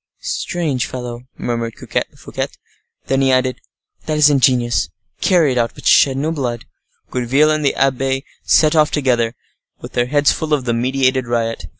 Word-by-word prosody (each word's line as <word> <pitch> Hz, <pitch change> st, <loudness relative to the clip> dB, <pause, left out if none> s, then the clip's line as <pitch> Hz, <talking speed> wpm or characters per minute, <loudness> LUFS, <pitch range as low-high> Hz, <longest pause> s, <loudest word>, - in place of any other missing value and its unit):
"Strange 150 Hz, -8 st, -2 dB
fellow," 125 Hz, 0 st, -7 dB
murmured 115 Hz, -1 st, -3 dB
Fouquet. -, -, -4 dB, 0.6 s
Then 135 Hz, 0 st, +1 dB
he 135 Hz, -1 st, +3 dB
added, 130 Hz, 0 st, +1 dB, 0.5 s
"That 155 Hz, -1 st, 0 dB
is 150 Hz, -1 st, +6 dB
ingenious. 125 Hz, -3 st, +2 dB, 0.3 s
Carry 170 Hz, -7 st, +3 dB
it 125 Hz, -, 0 dB
out, 115 Hz, 0 st, -1 dB
but -, -, -13 dB
shed 135 Hz, -1 st, +5 dB
no 150 Hz, +4 st, -1 dB
blood." 125 Hz, -7 st, -3 dB, 0.5 s
Gourville 135 Hz, +5 st, +2 dB
and 155 Hz, 0 st, 0 dB
the 140 Hz, -, +1 dB
abbe 135 Hz, 0 st, 0 dB, 0.2 s
set 155 Hz, +1 st, +4 dB
off 155 Hz, -1 st, +4 dB
together, 120 Hz, -5 st, 0 dB, 0.4 s
with -, -, -10 dB
their 120 Hz, 0 st, +1 dB
heads 145 Hz, +2 st, +3 dB
full 155 Hz, -1 st, 0 dB
of 135 Hz, -4 st, -5 dB
the 120 Hz, -, 0 dB
meditated 130 Hz, +1 st, +1 dB
riot. 115 Hz, -1 st, -2 dB
130 Hz, 165 wpm, -18 LUFS, 120-145 Hz, 0.6 s, is